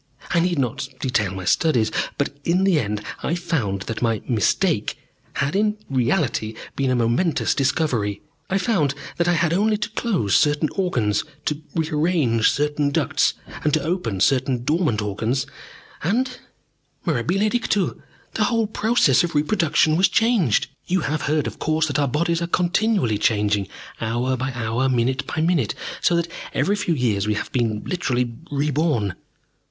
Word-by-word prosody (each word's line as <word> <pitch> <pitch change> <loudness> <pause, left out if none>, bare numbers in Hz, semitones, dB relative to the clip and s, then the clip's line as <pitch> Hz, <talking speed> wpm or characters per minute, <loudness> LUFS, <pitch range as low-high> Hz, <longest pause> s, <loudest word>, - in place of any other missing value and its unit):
I 175 - +3
need 175 0 +1
not 135 0 -1
detail 110 -8 0
my 95 -1 -6
studies. 120 - +2 0.3
But 145 0 -1
in 180 +5 +2
the 190 -5 +4
end 105 -2 -3 0.2
I 170 - -1
found 135 - -2
that 115 - -5
my 115 -3 +1
'mistake' 110 -7 +1 0.4
had 140 +3 -1
in 210 +1 +1
reality 125 - 0 0.2
been 135 -1 0
a 130 - +2
momentous 120 +8 +1
discovery. 130 -8 0 0.3
I 195 - +1
found 185 - +1 0.2
that 170 0 +1
I 175 - +4
had 170 -1 +2
only 210 +4 +2
to 215 +1 -4
close 195 - 0
certain 150 +1 +3
organs, 115 - 0 0.2
to 150 0 -1
re 160 -2 0
arrange 150 -8 +2
certain 145 0 0
ducts, 145 - +1 0.3
and 150 0 +3
to 155 - -1
open 155 - -2
certain 130 +1 +2
dormant 150 - +1
organs, 110 +6 -1 0.6
and, 250 - 0 0.7
mirabile 175 - +1
dictu, 215 -6 0 0.3
the 215 - +1
whole 230 0 +1
process 215 - +3
of 170 -2 -3
reproduction 155 -1 +2
was 185 - +4
changed. 215 - +2 0.2
"You 185 0 +1
have 155 +1 -1
heard, 155 -1 +1
of - - -5
course, 155 0 +1
that 145 -2 -1
our 140 - +2
bodies 170 +5 0
are 170 - -1
continually 175 - +1
changing, 105 -3 +1 0.3
hour 120 +3 0
by 130 +1 -2
hour, 120 +2 0
minute 130 +1 0
by 155 - -2
minute, 160 - +1 0.3
so 175 - +3
that 170 0 +1 0.3
every 200 - +2
few 205 -5 0
years 110 -7 0
we 105 - +1
have - - -4
been 115 -4 0
literally 125 -9 -1 0.2
reborn. 145 - 0
145 Hz, 160 wpm, -22 LUFS, 120-175 Hz, 0.7 s, the